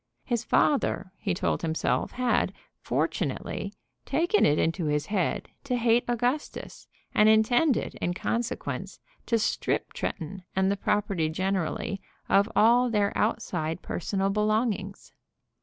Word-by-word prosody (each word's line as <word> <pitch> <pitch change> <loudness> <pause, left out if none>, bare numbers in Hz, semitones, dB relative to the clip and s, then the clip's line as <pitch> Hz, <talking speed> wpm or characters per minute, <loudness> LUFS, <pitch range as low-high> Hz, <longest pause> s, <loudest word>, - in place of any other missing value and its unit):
His 240 -3 -1
father, 265 -9 +1
he 195 -5 -1
told - - 0
himself, 160 -1 0
had, 250 -1 +1 0.3
fortunately, - - -2 0.3
taken 340 +9 +2
it 150 - +3
into 165 +1 0
his 150 0 0
head 200 -4 -1 0.2
to 255 -3 0
hate 235 0 +3
Augustus, 245 +5 -2 0.3
and 215 0 +5
intended, 240 +6 +3
in 175 0 -1
consequence, 230 +5 -3 0.3
to 230 - +3
strip 215 - -1
Tretton 185 +2 -4
and 190 +1 +2
the - - +1
property 195 -5 0
generally 190 +2 -2 0.3
of 200 +2 +4
all 240 +3 +5
their 205 -3 +1
outside 175 -7 -1
personal 195 +2 -1
belongings. 210 -1 -1
210 Hz, 125 wpm, -27 LUFS, 185-235 Hz, 0.3 s, and